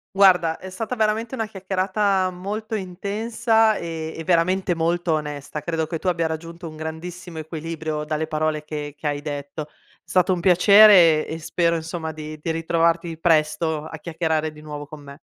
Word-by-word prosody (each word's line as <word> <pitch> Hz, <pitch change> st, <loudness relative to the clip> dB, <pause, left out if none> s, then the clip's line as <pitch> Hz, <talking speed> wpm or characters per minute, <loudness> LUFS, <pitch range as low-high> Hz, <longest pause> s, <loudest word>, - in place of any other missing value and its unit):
Guarda 180 Hz, -4 st, +5 dB
è 190 Hz, -, -9 dB
stata 225 Hz, +6 st, -4 dB
veramente 225 Hz, +3 st, 0 dB
una 225 Hz, -2 st, -1 dB
chiacchierata 190 Hz, -1 st, 0 dB
molto 210 Hz, +5 st, -4 dB
intensa, 220 Hz, +4 st, +1 dB
ehm, 165 Hz, -3 st, -5 dB
e 165 Hz, -, -5 dB
veramente 180 Hz, +2 st, +2 dB
molto 170 Hz, +1 st, 0 dB
onesta. 150 Hz, -1 st, -4 dB
Credo 160 Hz, 0 st, -1 dB
che 160 Hz, 0 st, -4 dB
tu 185 Hz, -, -5 dB
abbia 170 Hz, -2 st, +1 dB
raggiunto 165 Hz, +2 st, -6 dB
un 155 Hz, -, -9 dB
grandissimo 165 Hz, +2 st, -7 dB
equilibrio 160 Hz, -1 st, -4 dB
dalle 155 Hz, +1 st, -2 dB
parole 155 Hz, -1 st, -1 dB
che 150 Hz, -1 st, -6 dB
che 150 Hz, -, -13 dB
hai 145 Hz, 0 st, -2 dB
detto. 145 Hz, 0 st, -5 dB, 0.4 s
Stato 185 Hz, 0 st, +2 dB
un 180 Hz, -, -2 dB
piacere 180 Hz, -3 st, +7 dB
e 160 Hz, -, -4 dB
spero 170 Hz, +1 st, +1 dB
insomma 160 Hz, 0 st, -4 dB
di 155 Hz, 0 st, -8 dB
di 165 Hz, -, -1 dB
ritrovarti 165 Hz, 0 st, 0 dB
presto 155 Hz, -1 st, +1 dB
a 160 Hz, 0 st, -8 dB
chiacchierare 160 Hz, -1 st, -1 dB
di 150 Hz, -, -13 dB
nuovo 150 Hz, -1 st, -7 dB
con 155 Hz, -1 st, -10 dB
me. 140 Hz, +1 st, -11 dB
165 Hz, 170 wpm, -23 LUFS, 155-185 Hz, 0.4 s, piacere